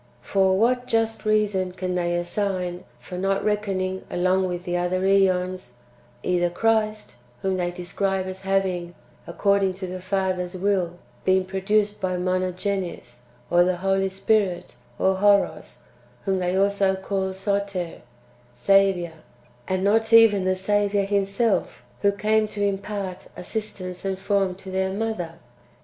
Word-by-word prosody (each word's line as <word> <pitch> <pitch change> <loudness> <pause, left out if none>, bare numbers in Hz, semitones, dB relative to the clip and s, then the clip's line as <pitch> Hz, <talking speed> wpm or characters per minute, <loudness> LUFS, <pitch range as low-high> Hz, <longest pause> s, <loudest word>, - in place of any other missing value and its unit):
For 190 +2 +2
what 245 +3 +2
just 225 0 0
reason 205 -4 +1
can 185 0 -3
they 175 -1 0
assign 180 0 -2
for 125 +9 -8
not 195 +1 0
reckoning 195 -3 -1
along 185 +1 +1
with 175 -1 -4
the 175 -1 -2
other 180 +1 0
^ons, 185 -5 +1 0.5
either 175 -1 +1
Christ, 215 - 0 0.3
whom 190 -1 0
they 175 -1 0
describe 185 +2 -2
as 185 0 -6
having, 190 -3 -1 0.3
according 200 +2 +2
to 190 0 -5
the 185 0 -6
Father's 185 -1 -1
will, 185 -2 0 0.3
been 185 0 +3
produced 205 +2 0
by 185 -1 -1
Monogenes, 185 - -2 0.3
or 175 0 +6
the 180 0 +1
Holy 195 0 +2
Spirit, 195 - 0 0.2
or 190 0 +2
Horos, 195 -10 +2 0.4
whom 190 -1 +1
they 180 0 0
also 195 0 +2
call 190 0 -2
Soter^ 195 -2 -2 0.5
(Saviour), 185 +4 +3 0.5
and 185 0 -1
not 220 +3 +2
even 225 -4 +6
the 185 0 +2
Saviour 205 +1 +1
Himself, 200 +2 0 0.2
who 200 - +4
came 215 +1 +1
to 205 -1 -4
impart 200 -1 -3
assistance 185 -3 -5
and 195 -1 -2
form 195 -1 0
to 190 0 -10
their 190 0 0
Mother? 195 -5 -3
190 Hz, 135 wpm, -24 LUFS, 180-200 Hz, 0.5 s, or